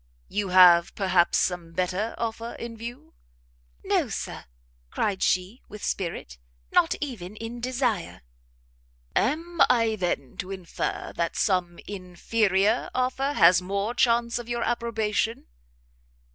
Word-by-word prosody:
"You 205 -1 -2
have, 180 -2 +7
perhaps, 185 -3 +3
some 180 -2 0
other 165 - -17
better 185 +5 -1
offer 230 0 -4
in 235 -1 -7
view?" 235 +2 -9 0.7
"No, - - +1
Sir," - - -5 0.4
cried 200 - -1
she, 185 +6 0
with 210 0 -10
spirit, 165 - -3 0.3
"nor - - +5
even 215 -9 -5
in 230 +2 -7
desire." 235 - -2 0.9
"Am 330 +7 0
I, 230 -3 +3
then, 175 - -3
to 185 - -5
infer 185 -3 -4
that 170 0 -1
some 180 -3 0
inferior 195 +2 0
offer 260 +3 0
has 180 -10 +6
more 200 +5 -2
chance 235 -1 +2
of 240 0 -8
your 235 -1 -1
approbation?" 225 -2 -1
210 Hz, 125 wpm, -26 LUFS, 180-235 Hz, 0.9 s, have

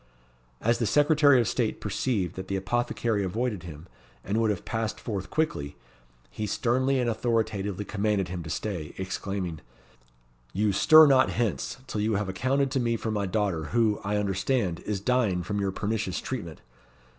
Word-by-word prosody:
As 115 +2 +2
the 115 - +1
Secretary 145 +1 +5
of 115 - +1
State - - -1
perceived 100 -9 -1
that 95 0 -6
the 95 - -2
apothecary 115 +1 0
avoided 105 +1 -2
him, 80 -2 -10 0.4
and 105 +4 0
would 110 - +2
have 100 -4 -2
passed 110 -1 -2
forth 100 -5 -4
quickly, 75 - -1 0.6
he 110 - -4
sternly 130 +5 +1
and 125 - 0
authoritatively 110 -4 -1
commanded 105 -2 0
him 90 0 -5
to 80 - -8
stay, 85 -1 -4
exclaiming, 95 -3 -4 0.9
"You 105 0 +1
stir 155 +10 +8
not 135 -3 +5
hence, 105 - -2
till 105 - -3
you 110 0 +1
have 100 -1 -1
accounted 130 +7 0
to 135 - +1
me 115 -2 0
for 110 - -3
my 100 -2 -1
daughter, 95 -6 -1
who, 110 +4 +1
I 105 +1 0
understand, 100 -1 0
is 105 -2 -1
dying 105 -5 +1
from 105 +2 -2
your 100 -1 0
pernicious 105 -1 -2
treatment. 100 -12 -6
105 Hz, 170 wpm, -27 LUFS, 95-120 Hz, 0.9 s, stir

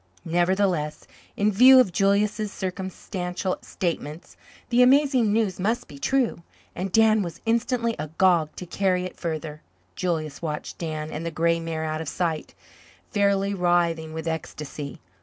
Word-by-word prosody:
Nevertheless, 175 -2 0 0.3
in 205 +1 +2
view 255 +6 +8
of 245 -8 +4
Julius's 205 +3 +1
circumstantial 185 -1 -4
statements, 165 -3 -4 0.3
the 245 0 +4
amazing 260 -3 +4
news 210 -4 0
must 225 +6 -1
be 140 - -12
true, 260 - 0 0.3
and 185 +2 -3
Dan 220 0 +5
was 170 -4 -5
instantly 235 0 +1
agog 160 +1 +2
to 180 - -7
carry 185 0 0
it 185 - -6
further. 155 -2 -4 0.3
Julius 155 -5 -2
watched 150 -3 -5
Dan 155 -2 -4
and 150 - -5
the 170 - -2
grey 165 +1 +1
mare 165 -1 -3
out 155 0 -2
of 160 - -4
sight, 165 -3 -2 0.6
fairly 200 -1 +2
writhing 175 -3 +1
with 160 +1 -5
ecstasy. 150 -3 -5
180 Hz, 140 wpm, -25 LUFS, 160-205 Hz, 0.6 s, view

